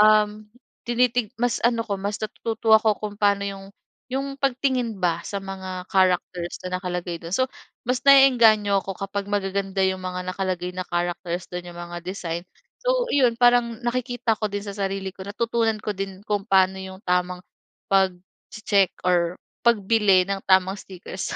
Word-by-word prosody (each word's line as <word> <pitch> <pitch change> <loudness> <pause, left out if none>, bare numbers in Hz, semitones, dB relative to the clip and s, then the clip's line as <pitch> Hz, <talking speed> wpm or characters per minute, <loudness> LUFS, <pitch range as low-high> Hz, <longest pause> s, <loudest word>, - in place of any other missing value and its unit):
um, 215 0 +4 0.4
tinitig 240 -1 +2
mas 245 -1 +1
ano 230 -1 +2
ko, 200 -3 -2
mas 205 +1 -2
natututo 220 +1 -1
ako 220 -1 +5
kung 210 -1 -4
paano 200 -1 +3
yung 195 -1 -6 0.4
yung 275 +1 -3
pagtingin 255 -4 0
ba 170 -2 +1
sa 200 - -4
mga 190 -1 -6
characters 180 -2 +1
na 185 0 -2
nakalagay 180 -1 -3
do'n. 165 - -8
So, 260 +6 +3 0.4
mas 250 0 +1
na-e-engganyo 235 -8 +6
ako, 195 -1 -5
kapag 195 0 -4
magaganda 195 -1 -1
yung 190 0 -1
mga 180 0 -4
nakalagay 180 -2 -2
na 185 - -2
characters 175 0 -2
do'n, 175 0 -5
yung - - -14
mga 175 0 -6
design. 175 -2 -4 0.4
So, - - +2
'yon 250 -5 +3
parang 240 -1 +3
nakikita 245 -1 0
ko 215 - -1
din 205 0 -3
sa 200 - -5
sarili 195 -1 -2
ko 190 -1 -10
natutunan 230 +1 0
ko 210 - -2
din 195 0 -5
kung 205 -2 -1
paano 190 0 +4
yung 190 0 -8
tamang 180 0 0 0.5
pagche-check 195 +1 +1
or 175 -1 +2 0.3
pagbili 210 -4 +4
ng 195 0 -1
tamang 190 +1 +4
stickers. 185 0 -6
195 Hz, 160 wpm, -24 LUFS, 185-225 Hz, 0.5 s, na-e-engganyo